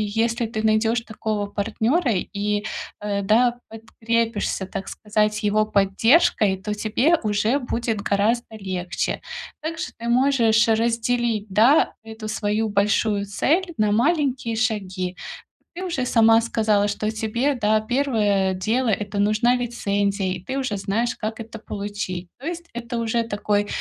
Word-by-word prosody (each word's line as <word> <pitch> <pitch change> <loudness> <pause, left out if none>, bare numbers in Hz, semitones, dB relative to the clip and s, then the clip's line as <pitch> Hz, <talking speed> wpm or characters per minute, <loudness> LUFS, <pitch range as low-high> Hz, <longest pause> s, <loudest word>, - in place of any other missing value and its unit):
если 230 +1 +1
ты 220 -1 -4
найдёшь 220 +2 +2
такого 215 -2 -3
партнёра 225 - 0
и, 205 +2 -2 0.4
э, 205 -1 -1
да, 240 +4 +3
подкрепишься, 225 -2 -2
так 190 +1 -6
сказать, 210 0 -1
его 210 +1 +2
поддержкой, 210 - +3
то 200 +3 -4
тебе 230 +10 +2
уже 215 +5 +1
будет 235 -4 -2
гораздо 220 +4 0
легче. 185 -3 -3 0.4
Также 320 +1 -4
ты 235 - -6
можешь 235 -3 +3
разделить, 230 -1 +1
да, 225 +10 +4
эту 220 -1 -8
свою 215 0 -1
большую 205 0 +1
цель 340 - 0
на 210 -1 +2
маленькие 260 -1 +1
шаги. 190 -5 -2 0.6
Ты 370 - -4
уже 335 -9 -2
сама 225 -2 +5
сказала, 215 -3 +1
что 215 +1 -2
тебе, 225 +5 0
да, 215 -3 +2
первое 215 -6 +1
дело- 225 +7 0 0.2
это 200 0 -5
нужна 215 +4 +3
лицензия, 200 -5 -1
и - - -3
ты 265 +8 -4
уже 255 -7 -2
знаешь, 220 +5 -1
как 220 +1 -4
это 225 0 -9
получить. 200 -4 -5
То 270 - -11
есть 340 0 -5
это 235 0 -5
уже 230 0 0
такой, 205 -1 -1
220 Hz, 140 wpm, -23 LUFS, 205-235 Hz, 0.6 s, сама